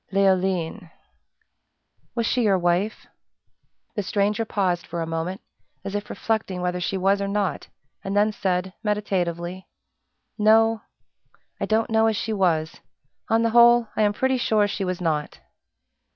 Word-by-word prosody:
"Leoline." 190 -2 +1 1.3
"Was 235 -1 0
she 250 - +1
your 205 -4 +3
wife?" 180 +4 0 0.9
The 210 - -2
stranger 205 +3 0
paused 185 -5 0
for 170 0 -3
a - - -3
moment, 165 +3 -4 0.4
as 195 0 -5
if 205 0 -4
reflecting 215 -5 -2
whether 180 0 -2
she 190 +2 -1
was 195 +2 +2
or 200 - -1
not, 200 -5 -2 0.4
and 195 +1 -2
then 210 +1 +3
said, 185 -2 -2
meditatively, 185 -4 -2 0.7
"No 225 +1 +4 0.8
I - - -2
don't 225 +2 +1
know 220 0 +4
as 220 - +1
she 220 - -2
was. 165 -6 0 0.5
On 225 +1 +3
the 230 - +1
whole, 240 -1 +6
I - - 0
am 210 -1 +4
pretty 260 +4 +1
sure 215 -3 +2
she 200 0 -3
was 185 -1 -3
not." 155 -3 -2
200 Hz, 150 wpm, -24 LUFS, 180-220 Hz, 1.3 s, whole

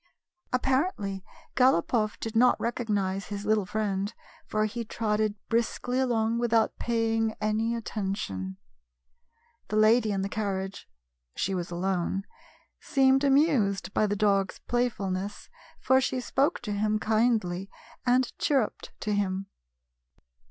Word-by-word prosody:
Apparently, 255 - 0 0.3
Galopoff 225 -3 +2
did 225 0 -5
not 250 +2 +5
recognize 200 -5 -1
his 205 0 -5
little 210 -3 +2
friend, 205 -1 -2 0.3
for 215 0 +1
he 230 +2 -3
trotted 215 -1 -1
briskly 235 +2 0
along 230 -3 +1
with 240 -1 0
out 220 -1 +3
paying 225 -1 0
any 220 +2 0
attention. 190 - -4 1.1
The - - -3
lady 215 +1 +4
in 195 -1 -1
the - - -1
car 205 -1 -2
riage 190 +1 -5 0.2
— - - -50
she 195 - -1
was 175 -2 -3
alone 185 +2 -1 0.3
— - - -34
seemed 270 0 +3
amused 270 - +2
by 215 - +2
the 205 - 0
dog's 200 -2 +1
playfulness, 205 -5 -2 0.3
for 260 +1 +4
she 255 0 -1
spoke 275 +6 0
to 215 - -4
him 210 +1 +1
kindly, 215 -4 +1 0.3
and 250 0 +4 0.2
cliirrujied 270 -7 0
to 210 - -1
him. 195 -1 -1
215 Hz, 130 wpm, -28 LUFS, 195-235 Hz, 1.1 s, not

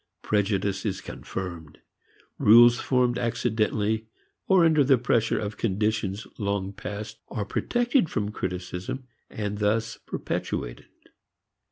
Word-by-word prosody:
Prejudice 100 -2 0
is 100 -4 -2
confirmed. 85 -5 -7 0.6
Rules 120 +2 +7
formed 125 -2 +1
accidentally 110 -2 0 0.4
or 185 -3 +5
under 155 -3 +5
the 135 -1 +5
pressure 115 -2 +1
of 105 -1 -4
conditions 105 -1 -1
long 100 -2 -1
past, 105 +2 -7
are 105 - -3
protected 240 - +1
from 105 0 -2
criticism 90 +6 -4 0.3
and 105 -1 -4
thus 110 +2 0
perpetuated. - - -4
105 Hz, 110 wpm, -26 LUFS, 100-120 Hz, 0.6 s, Rules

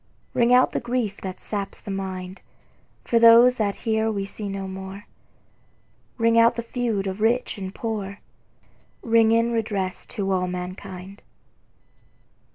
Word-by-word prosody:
Ring 235 0 +3
out 250 +1 +5
the - - -1
grief 240 -4 -2
that 185 -1 -6
saps 200 -2 -5
the 205 - -7
mind, 190 -1 -5 0.6
For 230 - +3
those 235 +2 +7
that 205 -2 0
here 220 0 +1
we 200 -2 -2
see 200 +1 -6
no 195 0 -4
more, 190 +1 -8 1.1
Ring 230 -1 +4
out 230 +1 +5
the 235 - -3
feud 230 -4 -2
of 190 +2 -4
rich 230 -1 +1
and 190 -1 -5
poor, 205 -2 -4 0.8
Ring 225 -1 +4
in 230 +1 +3
redress 205 -5 -2
to 195 -4 -3
all 185 -1 +1
mankind. 185 +2 -7
205 Hz, 145 wpm, -24 LUFS, 190-230 Hz, 1.1 s, those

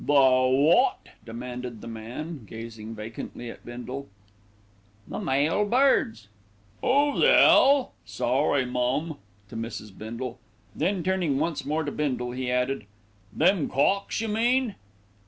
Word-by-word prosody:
"The 145 - 0
wot?" 135 +3 +4 0.2
demanded 120 0 -6
the - - -9
man, 120 +5 -7
gazing 115 0 -8
vacantly 115 +2 -7
at - - -14
Bindle. 125 +3 -7 1.0
"The - - -5
male 145 +9 +1
birds." 205 - +2 0.6
"'Oo 285 +2 +2
the 485 - +6
'ell 275 -1 +6
sorry, 135 +1 0
mum," 125 +5 -1 0.3
to - - -10
Mrs. 110 -3 -6
Bindle. 120 +3 -6 0.4
Then 190 -2 0
turning 180 -6 0
once 165 0 -2
more 155 +2 0
to 145 - -3
Bindle 125 -5 -2
he 125 0 -3
added, 125 -2 -1 0.4
"Them 175 - +2
cocks, 195 +12 +1
you 225 - -2
mean?" 235 +2 +1
135 Hz, 125 wpm, -26 LUFS, 120-170 Hz, 1.0 s, the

